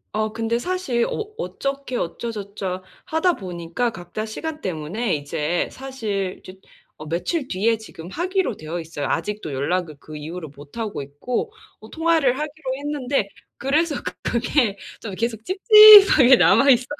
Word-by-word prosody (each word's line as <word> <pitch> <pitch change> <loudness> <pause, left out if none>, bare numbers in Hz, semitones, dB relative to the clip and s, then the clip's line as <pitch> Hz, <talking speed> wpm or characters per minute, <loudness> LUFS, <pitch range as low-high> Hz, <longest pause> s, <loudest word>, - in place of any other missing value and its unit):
어. 215 0 0
근데 225 +1 -1
사실 275 -8 -1
어 430 0 -5
어떻게 275 - -4
어쩌저쩌 200 -2 -4 0.2
하다 320 +3 +1
보니까 175 +5 -3
각자 215 +2 -6
시간 310 +8 -6
때문에 185 +5 -2
이제 150 +3 -2
사실 215 -8 -4
저 - - -9 0.5
어, 155 - -9
며칠 260 - -2
뒤에 225 +3 +1
지금 175 -6 -11
하기로 365 - -1
되어 155 +3 -5
있어요. 155 -4 -5
아직도 210 -7 -3
연락을 155 +3 -2
그 155 - -11
이후로 160 +2 -7
못하고 175 +8 -6
있고. 145 - -4 0.3
어. - - -14
통화를 320 -6 +2
하기로 295 -3 -4
했는데 280 -5 -1 0.3
그래서 295 +3 +1
그 - - -3
그게 235 -3 0 0.2
좀 205 -4 -6
계속 225 0 -3
찝찝하게 395 - +9
남아 275 +3 +5
있어서. 250 -2 +5
225 Hz, 310 characters per minute, -22 LUFS, 180-285 Hz, 0.5 s, 찝찝하게